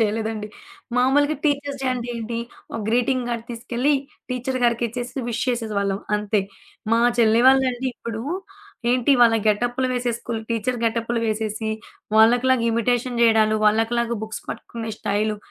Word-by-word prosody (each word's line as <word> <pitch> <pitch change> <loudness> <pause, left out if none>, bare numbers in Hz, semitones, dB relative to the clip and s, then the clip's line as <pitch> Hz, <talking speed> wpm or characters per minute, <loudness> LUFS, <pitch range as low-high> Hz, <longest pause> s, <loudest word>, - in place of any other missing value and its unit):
చేయలేదండి. 220 0 -1 0.5
మామూలుగా 285 +4 +3
teachers 285 -1 0
day - - -1
అంటే 245 -1 -4
ఏంటి? 230 0 -4 0.3
ఒక 225 - -3
గ్రీటింగ్ 245 +2 +1
కార్డ్ 235 -1 -3
తీసుకెళ్ళి, 240 +4 0 0.4
టీచర్ 255 +1 -2
గారికిచ్చేసి 240 +2 -1
విష్ 235 0 -2
చేసేసేవాళ్ళం 205 -5 -1 0.2
అంతే. 210 0 0 0.5
మా 230 - +4 0.2
చెల్లి 225 0 +5
వాళ్లండి 260 -1 +3
ఇప్పుడు 230 -1 -6 0.7
ఏంటి, 255 +2 +3
వాళ్ళ 230 -1 +6
గెటప్‌లు 245 +4 +1
వేసేసి 245 -2 -1
స్కూలు 230 -2 -4
టీచర్ 235 +2 -1
గెటప్‌లు 230 +1 0
వేసేసి, 220 0 -2 0.5
వాళ్ళకి 240 +3 +5
లాగా 250 -3 +3
ఇమిటేషన్ 240 +1 0
చేయడాలు, 220 -1 +4
వాళ్ళకి 225 +2 +2
లాగా 235 0 0
బుక్స్ 220 0 -6
పట్టుకునే 230 -1 -6
స్టైలు, 210 +1 0
235 Hz, 140 wpm, -23 LUFS, 220-250 Hz, 0.7 s, వాళ్ళ